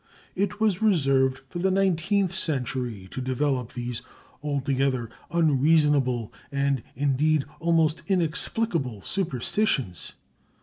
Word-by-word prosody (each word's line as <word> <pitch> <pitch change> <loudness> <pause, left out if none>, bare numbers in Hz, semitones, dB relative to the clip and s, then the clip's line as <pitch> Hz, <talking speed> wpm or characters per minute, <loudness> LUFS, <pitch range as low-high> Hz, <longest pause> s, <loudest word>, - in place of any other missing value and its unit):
It 200 +1 -1
was 215 -4 +1
reserved 135 -10 +3
for 175 - -6
the 190 +2 +2
nineteenth 190 0 +1
century 125 - -2
to 130 - -4
develop 130 -1 -1
these 120 -1 -4 0.4
altogether 135 -4 -1 0.2
unreasonable—and 140 -4 +1
indeed 145 +2 +2
almost 165 -1 +2
inexplicable—superstitions. 165 - 0
145 Hz, 85 wpm, -26 LUFS, 130-170 Hz, 0.4 s, reserved